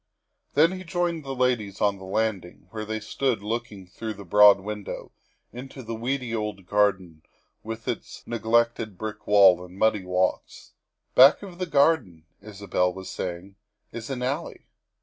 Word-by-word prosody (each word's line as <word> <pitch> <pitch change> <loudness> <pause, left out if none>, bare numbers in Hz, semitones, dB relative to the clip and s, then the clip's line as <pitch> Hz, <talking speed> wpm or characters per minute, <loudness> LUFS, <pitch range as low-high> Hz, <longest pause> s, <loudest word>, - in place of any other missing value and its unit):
Then 160 +4 +5
he 185 0 -6
joined 175 -2 -2
the 135 -1 -5
ladies 120 -6 0
on 100 -2 +1
the 95 - -10
landing, 95 -4 -3
where 110 -1 -5
they 110 0 -3
stood 115 0 -2
looking 110 -3 -4
through 110 +4 -6
the 100 0 -11
broad 105 +2 +7
window 105 +1 -7 0.4
into 130 +2 -9
the 115 0 -5
weedy 125 +1 -3
old 105 -4 -4
garden 95 -5 0 0.4
with 115 +1 -7
its - - -5
neg 120 -1 -5
lected 115 -3 +1
brick 110 0 -7
wall 95 -3 +6
and 90 +1 -13
muddy 110 -2 +2
walks. 90 0 -2 0.2
" - - -53
Back 135 +9 +7
of 185 -3 -10
the 185 - -2
garden," 140 - +2 0.2
Isabel 100 -3 -1
was 95 +1 -8
saying, 90 +2 -6 0.3
"is 115 +1 -7
an 125 -2 -3
alley." 140 +6 -4
110 Hz, 165 wpm, -25 LUFS, 95-125 Hz, 0.4 s, broad